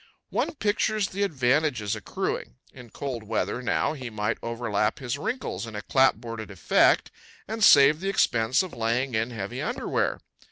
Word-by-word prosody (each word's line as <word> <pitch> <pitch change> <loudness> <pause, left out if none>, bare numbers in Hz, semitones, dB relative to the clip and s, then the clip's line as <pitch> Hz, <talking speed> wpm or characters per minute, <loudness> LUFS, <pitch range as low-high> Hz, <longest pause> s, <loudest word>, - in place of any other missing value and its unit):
One - - -1
pictures 215 -3 0
the 200 - -5
advantages 130 - +1
accruing. 100 - -4 0.2
In 125 -2 -12
cold 130 -1 -5
weather, 110 +3 -2
now, 125 - 0
he 130 -5 -6
might 110 0 -2
overlap 115 -2 -1
his 125 -1 -3
wrinkles 215 - -4
in 110 - -8
a 105 - -5
clapboarded 115 -5 +1
effect 95 -5 +3 0.4
and 220 +1 -3
save 145 -2 +7
the 195 +2 -2
expense 120 - +2
of 185 - -8
laying 115 +3 -1
in 110 +2 0
heavy 100 -5 -5
underwear. - - -1
125 Hz, 155 wpm, -26 LUFS, 110-155 Hz, 0.4 s, save